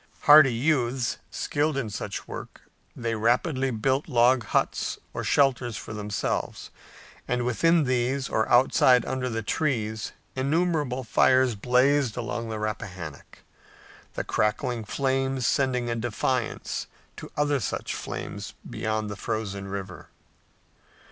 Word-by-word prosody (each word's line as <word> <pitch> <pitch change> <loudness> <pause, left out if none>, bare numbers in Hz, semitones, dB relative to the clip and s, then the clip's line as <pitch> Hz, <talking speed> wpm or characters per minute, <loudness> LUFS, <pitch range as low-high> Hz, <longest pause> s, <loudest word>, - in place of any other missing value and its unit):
Hardy 145 -4 +8
youths, 125 -2 0
skilled 145 0 -1
in 115 -6 -2
such 100 -1 -5
work, - - -8 0.3
they 115 -1 -2
rapidly 130 +5 +1
built 130 +4 0
log 125 -1 +4
huts - - 0 0.2
or - - -4
shelters 125 -5 +2
for - - -7
themselves, 105 -1 -3 0.6
and 125 -1 0
within 165 +7 +3
these 130 +1 0
or 110 - 0
outside 125 0 +5
under 130 -1 -2
the 115 -1 -3
trees 110 -5 -1 0.2
innumerable 145 -2 0
fires 130 +2 +4
blazed 125 +3 +2
along 115 -1 -3
the 110 - -3
Rappahannock, 95 -8 -6 0.7
the - - -2
crackling 115 +2 -1
flames 135 -1 0
sending 130 -4 +1
a 115 - -1
defiance 120 +1 -2 0.3
to - - -9
other 145 -1 +2
such 115 - -3
flames - - -6
beyond 110 0 -2
the 105 - -5
frozen 100 0 -4
river. 95 -2 -7
125 Hz, 120 wpm, -26 LUFS, 110-135 Hz, 0.7 s, Hardy